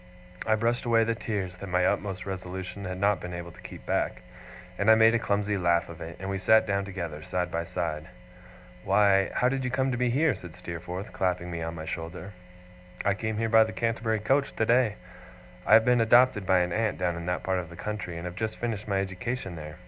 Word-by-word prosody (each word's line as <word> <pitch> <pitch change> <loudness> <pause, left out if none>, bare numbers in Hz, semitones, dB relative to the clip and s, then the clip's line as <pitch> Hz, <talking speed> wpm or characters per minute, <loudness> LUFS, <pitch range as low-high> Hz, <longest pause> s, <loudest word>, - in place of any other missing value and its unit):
I 110 - +4
brushed 115 +3 0
away 115 -1 +3
the 115 +1 0
tears 100 -5 -4
that 100 +1 -8
my 90 0 +2
utmost 95 -3 -1
resolution 95 0 -6
had 90 0 -4
not 100 0 +2
been 90 0 -6
able 85 0 -7
to - - -16
keep - - -10
back, - - -1 0.6
and 100 +2 +3
I 110 - +9
made 110 +1 +6
a 120 - +3
clumsy 105 -1 0
laugh 85 -1 +2
of 85 0 -10
it, 80 0 -7
and 95 - -5
we 95 0 -2
sat 110 +4 +5
down 100 -1 0
together, 85 -6 -5
side 90 0 -2
by 85 0 -2
side. 80 -3 -3 0.8
'Why, 100 -2 +4
how 125 - +2
do 135 +2 +1
you 130 -1 -2
come 130 +1 0
to 125 - -2
be 125 -1 +2
here?' 145 +4 +3
said 90 -4 -10
Steerforth, 90 +2 -6
clapping 90 -1 -1
me 85 -1 -4
on 80 0 -4
the 80 -1 -6
shoulder. 85 +5 -6 0.7
'I 100 - +4
came 110 +2 -3
here 115 +1 0
by 110 0 +7
the 110 0 -5
Canterbury 115 -1 0
coach, 135 +6 +1
today. 115 -1 +3 0.7
I - - +8
have 110 0 +6
been 125 -1 +4
adopted 115 -3 +4
by 95 -1 +4
an 90 -1 -1
aunt 110 -1 0
down 90 -1 0
in 85 0 -6
that 90 - -1
part 95 -1 0
of 85 -2 -6
the 85 - -11
country, 105 -3 -5
and 85 - -6
have 90 - -5
just 110 +2 -3
finished 110 -3 -3
my 100 -2 +1
education 95 +1 -4
there. 75 -1 -8
100 Hz, 230 wpm, -28 LUFS, 90-110 Hz, 0.8 s, I